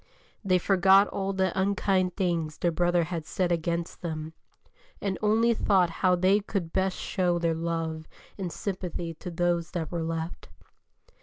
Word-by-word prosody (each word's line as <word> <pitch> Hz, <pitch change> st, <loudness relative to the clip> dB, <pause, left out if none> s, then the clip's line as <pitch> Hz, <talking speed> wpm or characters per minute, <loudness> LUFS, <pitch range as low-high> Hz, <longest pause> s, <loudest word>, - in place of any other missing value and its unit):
They 185 Hz, -2 st, +3 dB
forgot 195 Hz, +2 st, +5 dB
all 195 Hz, 0 st, -2 dB
the 190 Hz, -1 st, +1 dB
unkind 190 Hz, -1 st, +1 dB
things 170 Hz, -5 st, -1 dB
their 175 Hz, -, +1 dB
brother 175 Hz, +1 st, +2 dB
had 165 Hz, -1 st, -4 dB
said 175 Hz, +3 st, -1 dB
against 170 Hz, 0 st, -2 dB
them, 160 Hz, -2 st, -5 dB, 0.7 s
and 195 Hz, -2 st, -1 dB
only 225 Hz, +2 st, +3 dB
thought 190 Hz, -6 st, +2 dB
how 180 Hz, -1 st, +4 dB
they 185 Hz, +3 st, +3 dB
could 195 Hz, -5 st, -4 dB
best 190 Hz, 0 st, 0 dB
show 175 Hz, -2 st, 0 dB
their 170 Hz, -1 st, +1 dB
love 160 Hz, -1 st, -3 dB, 0.3 s
and 185 Hz, -4 st, -4 dB
sympathy 180 Hz, -4 st, -4 dB
to 170 Hz, -, -8 dB
those 175 Hz, 0 st, 0 dB
that 165 Hz, -4 st, -3 dB
were 170 Hz, -1 st, -2 dB
left. 165 Hz, +1 st, -4 dB
175 Hz, 155 wpm, -27 LUFS, 165-190 Hz, 0.7 s, forgot